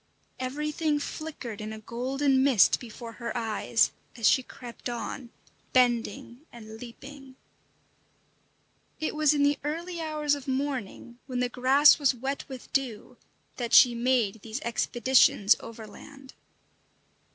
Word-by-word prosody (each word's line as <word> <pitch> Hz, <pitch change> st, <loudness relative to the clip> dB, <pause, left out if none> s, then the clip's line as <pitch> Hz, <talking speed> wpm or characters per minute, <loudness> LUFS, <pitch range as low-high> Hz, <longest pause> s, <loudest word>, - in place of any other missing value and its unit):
Everything 300 Hz, +4 st, -1 dB
flickered 290 Hz, -7 st, -6 dB
in 215 Hz, 0 st, -5 dB
a 220 Hz, -, -7 dB
golden 260 Hz, +5 st, 0 dB
mist 210 Hz, -, +4 dB
before 235 Hz, -1 st, -9 dB
her 235 Hz, -, -3 dB
eyes, 225 Hz, 0 st, +1 dB, 0.3 s
as 225 Hz, -2 st, +2 dB
she 260 Hz, -, +4 dB
crept 245 Hz, -1 st, -9 dB
on, 240 Hz, +1 st, -5 dB, 0.4 s
bending 245 Hz, +1 st, +1 dB
and 220 Hz, -2 st, -11 dB
leaping. 265 Hz, +2 st, -11 dB, 1.6 s
It 315 Hz, -, -2 dB
was 305 Hz, -1 st, +3 dB
in 285 Hz, -, +2 dB
the 285 Hz, 0 st, +2 dB
early 335 Hz, +3 st, -4 dB
hours 305 Hz, -2 st, -1 dB
of 285 Hz, -2 st, -4 dB
morning, 260 Hz, -3 st, -4 dB
when 255 Hz, -2 st, -3 dB
the 250 Hz, 0 st, 0 dB
grass 270 Hz, +5 st, +5 dB
was 275 Hz, -3 st, +2 dB
wet 270 Hz, +3 st, -4 dB
with 260 Hz, -2 st, -10 dB
dew, 250 Hz, -6 st, -3 dB, 0.4 s
that 235 Hz, -2 st, -4 dB
she 245 Hz, -2 st, +8 dB
made 235 Hz, -4 st, 0 dB
these 225 Hz, +3 st, -5 dB
expeditions 235 Hz, -3 st, +3 dB
overland. 260 Hz, +5 st, -12 dB
255 Hz, 130 wpm, -27 LUFS, 235-285 Hz, 1.6 s, she